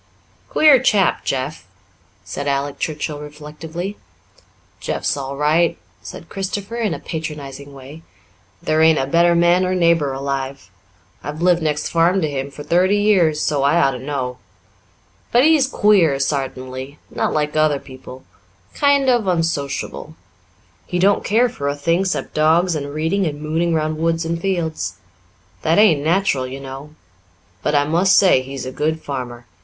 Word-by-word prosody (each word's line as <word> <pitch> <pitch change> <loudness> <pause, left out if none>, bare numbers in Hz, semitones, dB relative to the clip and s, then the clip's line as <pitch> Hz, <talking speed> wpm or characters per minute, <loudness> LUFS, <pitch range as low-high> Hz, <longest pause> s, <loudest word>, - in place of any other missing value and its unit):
"Queer 295 -5 +5
chap, 205 -7 +2
Jeff," 135 -3 -3 0.6
said 140 +9 -5
Alec 140 0 -2
Churchill 150 -1 -3
reflectively. 155 +6 -7 0.8
"Jeff's - - -2
all 140 -1 -5
right," 155 +4 +2 0.2
said - - -10
Christopher 200 +3 -4
in 225 -3 -1
a - - -8
patronizing 145 -4 -7
way. 140 +3 -12 0.6
"There 155 0 +1
ain't 160 -1 +5
a 135 - 0
better 170 +4 +3
man 175 +2 +4
or 185 0 0
neighbour 170 -5 +2
alive. 135 -6 -4 0.5
I've 150 +4 -5
lived 175 -1 +3
next 150 -1 -1
farm 170 +3 +2
to - - +1
him 140 -1 -4
for 145 +1 -10
thirty 185 +5 +2
years, 180 -7 +3
so 145 -3 0
I 145 +5 +3
ought 135 -4 +3
to 125 - -6
know. 130 -2 -4 0.9
But 240 +2 +5
he's 305 -3 +4
queer 195 - +3
sartainly 135 0 -4
not - - -1
like 150 0 -1
other 155 -2 +3
people 130 -1 -12 0.5
kind 285 -1 +2
of 240 -5 +2
unsociable. 165 -6 -2 0.7
He 180 - -2
don't 195 +3 +3
care 230 +4 +3
for 140 -12 -5
a 140 - -1
thing 165 +6 0
'cept 185 - -3
dogs 165 +4 +3
and 145 -2 -4
reading 160 +6 0
and 145 -1 -5
mooning 160 +2 -1
round 155 0 -1
woods 165 0 0
and 165 0 -3
fields. 170 -5 -2 0.7
That 160 +1 +2
ain't 180 -9 +4
natural, 160 -6 +1
you 135 +2 -7
know. 135 +3 -9 0.7
But 150 - 0
I 145 - +4
must 170 +6 +3
say 185 -9 +5
he's 135 0 -7
a 130 - -5
good 155 +4 -1
farmer. 125 -4 -6
155 Hz, 160 wpm, -19 LUFS, 140-175 Hz, 0.9 s, Queer